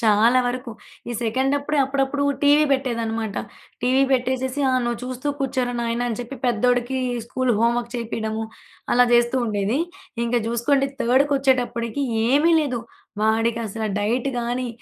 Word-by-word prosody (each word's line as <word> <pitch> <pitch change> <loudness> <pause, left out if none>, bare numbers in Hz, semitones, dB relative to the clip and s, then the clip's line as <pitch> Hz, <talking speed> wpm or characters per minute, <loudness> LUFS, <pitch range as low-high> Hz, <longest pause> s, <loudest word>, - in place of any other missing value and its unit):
చాలా 225 +3 +4
వరకు. 250 0 -3 0.4
ఈ - - -2
సెకండ్ 260 +5 +1
అప్పుడే 290 +1 -2
అప్పుడప్పుడు 270 +1 -1 0.2
టీవీ 290 +1 +5
బెట్టేదన్నమాట. 230 -5 -1 0.5
టీవీ 260 +2 +3
పెట్టేసేసి, 260 +2 0
"ఆ! - - 0
నువ్వు 240 -1 -2
చూస్తూ 255 +3 -4
కూర్చోరా 255 -2 -1
నాయనా!" 235 +1 -1
అని 225 - -3
చెప్పి 245 +3 -7
పెద్దోడికి 245 +2 +1 0.3
స్కూలు 255 0 0
హోమ్ 235 +1 +3
వర్క్ 235 0 -6
చేపియడము, 220 -1 -3 0.5
అలా 245 0 +6
జేస్తూ 240 +1 +3
ఉండేది. 210 +3 0 0.5
ఇంక 235 +1 -2
చూసుకోండి 270 +4 +1
థర్డ్‌కొచ్చేటప్పటికి 260 -1 +1 0.3
ఏమీ 295 +6 +4
లేదు. 255 -6 -2 0.4
వాడికసలు 225 -1 0
డైట్ 235 +6 0
గాని 245 +1 -2
245 Hz, 135 wpm, -22 LUFS, 230-265 Hz, 0.5 s, అలా